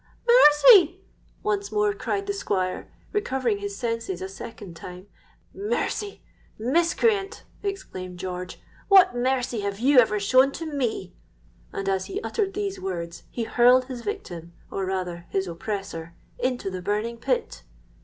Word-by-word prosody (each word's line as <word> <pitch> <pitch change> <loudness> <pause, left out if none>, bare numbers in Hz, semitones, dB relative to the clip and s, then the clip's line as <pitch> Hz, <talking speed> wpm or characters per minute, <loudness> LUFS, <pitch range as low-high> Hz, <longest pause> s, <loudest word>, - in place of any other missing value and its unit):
'Mercy!' 375 -4 +7 0.4
once 205 -1 -1
more 210 -1 +2
cried 395 - -2
the 405 - -1
Squire, 185 - -2 0.2
recovering 260 - 0
his 200 0 -5
senses 230 -5 -3
a 190 - -4
second 195 -2 -9
time.—'Mercy! 390 - -5 0.3
miscreant,' 345 - +1 0.2
exclaimed 185 - -5
George; 180 0 -6 0.3
'what 385 -8 +7
mercy 250 -1 0
have 200 -1 -3
you 265 +2 +6
ever 210 -3 +3
shown 255 +7 +4
to 330 - -6
me?' 280 -7 -2 0.6
and, 195 - -4
as 190 -1 0
he 390 - -4
uttered 405 -4 -2
these 405 -1 -3
words, 170 -3 -5
he 235 - -3
hurled 250 +2 +5
his 255 -2 -7
victim, 175 - -6 0.2
or 195 - -2
rather 180 -2 -3
his 195 0 0
oppressor, 170 -2 -5 0.2
into 250 -6 -1
the 185 -1 -5
burning 210 +5 -2
pit! 230 - -2
230 Hz, 135 wpm, -25 LUFS, 190-295 Hz, 0.6 s, Mercy